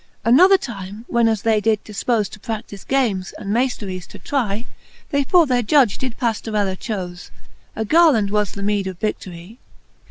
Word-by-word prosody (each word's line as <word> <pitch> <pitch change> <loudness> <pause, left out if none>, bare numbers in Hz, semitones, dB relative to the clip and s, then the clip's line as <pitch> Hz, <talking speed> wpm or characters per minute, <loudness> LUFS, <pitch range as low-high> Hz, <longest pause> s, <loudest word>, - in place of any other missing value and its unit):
XLIII. 230 - +4
Another 370 +8 +7
time, 205 - -8
when 235 -1 +3
as 220 -3 0
they 220 -2 +2
did 220 -1 +1
difpofe 215 0 -1
To 215 - -12
pradlife 210 -2 -7
games, 220 -9 0
and 200 0 -4
maifleries 210 -7 -2
to - - -12
try. 230 -5 -2 0.5
They 280 0 +2
for 340 +4 +4
their 250 -3 +1
judge 245 -2 +3
did 255 -3 -4
Paftorella 215 -5 -1
chofe; 180 -4 -6 0.5
A 220 - -2
garland 280 -8 +4
was 210 -1 0
the 200 - -6
meed 205 -1 0
of 185 -2 -6
vidiory. 190 0 -5
215 Hz, 170 wpm, -20 LUFS, 200-245 Hz, 0.5 s, Another